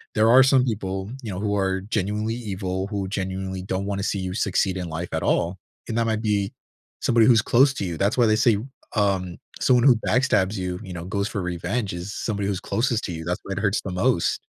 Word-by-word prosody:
there 110 0 +4
are 130 +3 +8
some 130 -1 +4
people, 95 -4 -3
you 110 - -4
know, 90 - -4
who 105 -1 0
are 95 -1 0
genuinely 105 +1 -1
evil, 95 -4 -3
who 100 -2 -3
genuinely 95 -1 -3
don't 95 +1 -3
wanna 100 -1 -2
see 100 - -1
you 95 -1 -3
succeed 95 -2 0
in 90 -2 -4
life 80 +2 -4
at - - -1
all, 90 +3 +1 0.3
and 115 - -3
that 115 - +2
might 110 -1 0
be 100 -2 0 0.5
somebody 115 -2 +4
who's 115 -4 +6
close 130 +3 +4
to 100 - -2
you. 85 -2 -3
That's 100 +7 +1
why 120 - +5
they 110 -1 +4
say, 115 -1 +3 0.4
um, 95 -4 0 0.2
someone 125 -2 +4
who 130 -4 +7
backstabs 110 -6 +2
you, 90 -1 -3
you 95 -3 -8
know, 85 -1 -6
goes 100 +2 -1
for 100 - -3
revenge, 95 +4 -2
is 90 +3 -5
somebody 100 -3 -2
who's 100 -2 -1
closest 115 +2 0
to - - -4
you, 80 0 -6
that's 90 +1 -2
why 100 - -8
it 95 - -3
hurts 100 0 +1
the 95 - -4
most. 95 +1 +1
100 Hz, 230 wpm, -24 LUFS, 95-110 Hz, 0.5 s, are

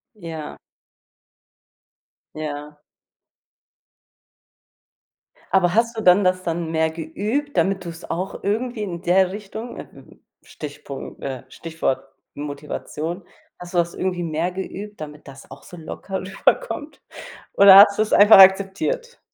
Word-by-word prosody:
Ja. 165 -6 -8 1.8
Ja. 150 -1 -6 2.8
Aber 180 -2 +3
hast 230 +1 +1
du - - -2
dann 185 +2 +6
das 185 0 +1
dann 165 -1 -3
mehr 160 0 +1
geübt, 210 - -4
damit 195 -1 +1
du's 170 0 -8
auch 185 +3 -4
irgendwie 225 +3 -2
in 175 -4 -5
der 185 +1 +3
Richtung, 215 +4 -8
äh, - - -7 0.6
Stichpunkt 145 -2 -9
äh, 130 -2 -5
Stichwort 165 -3 -3 0.3
Motivation, 150 +4 -6 0.3
hast 175 0 -11
du - - -1
das 170 0 +1
irgendwie 180 -2 -2
mehr 165 +2 -2
geübt, 195 +3 -7
damit 150 -1 -9
das 135 0 -13
auch 135 +1 -13
so 175 - -12
locker 190 +4 -6
rüberkommt, 295 - -1 0.5
oder 195 -1 +9
hast 200 0 +8
du's 215 0 0
einfach 205 +1 +8
akzeptiert? 195 - +3
180 Hz, 120 wpm, -22 LUFS, 160-200 Hz, 2.8 s, oder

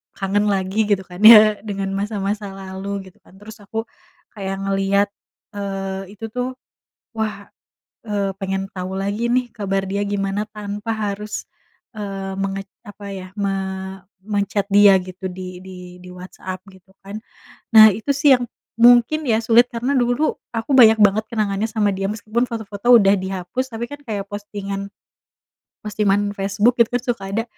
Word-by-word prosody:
kangen 205 +1 0
lagi 195 +2 0
gitu 200 -2 +2
kan 180 0 -12
ya 215 -2 +9
dengan 195 -2 -3
masa-masa 205 0 -2
lalu 195 0 -6
gitu - - -32
kan - - -20
terus 220 +3 -12
aku 220 +2 -4 0.5
kayak 195 -2 -5
ngeliat, 195 +1 +1 0.5
eee, 195 -1 -5
itu 225 - -7
tuh 250 +2 -3 0.6
wah, 215 -2 -3 0.6
eee, 200 -2 -1
pengen 195 0 -3
tau 185 0 -5
lagi 200 +4 -2
nih 250 -1 +1
kabar 195 -1 -1
dia 200 +1 -1
gimana 200 +1 -2
tanpa 210 0 -5
harus, 210 0 -4 0.5
eee, 195 -2 -5
menget 195 0 -3 0.2
apa 205 0 -11
ya 185 -1 -7
me 200 -1 -1 0.8
men-chat 200 -1 -1
dia 200 -1 +7
gitu 185 +1 -9
di 180 0 -8
di 180 -1 -11
di 180 - -11
WhatsApp 185 +1 -8
gitu 190 0 -21
kan, 200 +1 -10 0.6
nah 220 0 +11
itu 225 +8 -2
sih 280 -1 +6
yang 245 - -3 0.4
mungkin 245 +6 +5
ya 220 -2 +3
sulit 235 +2 +5
karena 240 +4 -1
dulu 245 +5 +1 0.2
aku 230 +4 -3
banyak 225 -4 +7
banget 210 +1 +4
kenangannya 210 -1 -1
sama 215 -2 +1
dia 195 0 -2
meskipun 220 +2 -2
foto-foto 220 0 -2
udah 200 -1 +4
dihapus 190 +7 -4
tapi 235 +1 -3
kan 290 - -7
kayak 210 -6 -4
postingan 200 -1 -6 1.0
postingan 205 -1 +1
Facebook 200 +4 +1
itu 235 +1 +2
suka 235 -6 -3
ada 225 - 0
205 Hz, 150 wpm, -20 LUFS, 195-220 Hz, 1.0 s, nah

